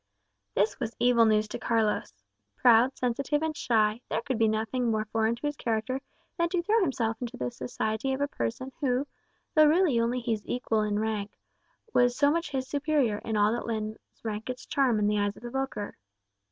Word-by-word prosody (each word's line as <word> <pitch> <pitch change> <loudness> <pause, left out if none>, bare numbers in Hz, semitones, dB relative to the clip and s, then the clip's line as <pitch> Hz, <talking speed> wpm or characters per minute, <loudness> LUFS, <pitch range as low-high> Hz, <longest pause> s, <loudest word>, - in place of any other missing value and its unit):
This 205 +1 +1
was 235 -3 -3
evil 240 -1 +4
news 215 -1 +3
to - - -5
Carlos. 210 - 0 0.3
Proud, 245 +2 +5
sensitive, 275 +5 0
and 320 -1 -1
shy, 220 -2 +1
there - - -1
could 260 -5 -2
be 225 - +4
nothing 220 +3 0
more 215 -1 0
foreign 225 +1 0
to 240 - -8
his 290 0 -1
character 240 +2 -2 0.4
than 340 0 +2
to 345 -1 0
throw 435 +4 +3
himself 235 - 0
into 240 -2 -5
the 125 -1 -2
society 220 - -2
of 265 - -1
a 285 - +1
person 190 - -4
who, 260 -1 +1 0.5
though 310 -2 +7
really 315 -5 +4
only 235 +2 +1
his 230 -3 -1
equal 230 -3 0
in 210 -1 0
rank, 210 -1 -2 0.6
was 245 0 +3
so 285 0 +4
much 335 +1 -1
his 265 -2 -3
superior 285 -7 +1
in 220 -1 -3
all 205 +1 +4
that 240 - -3
lends 215 -1 -3 0.2
rank 220 +1 -4
its 255 - -5
charm 265 -6 +2
in 210 - +1
the 210 0 +2
eyes 205 0 0
of - - -15
the 240 - -6
vulgar. 265 -6 -3
235 Hz, 200 wpm, -28 LUFS, 215-270 Hz, 0.6 s, though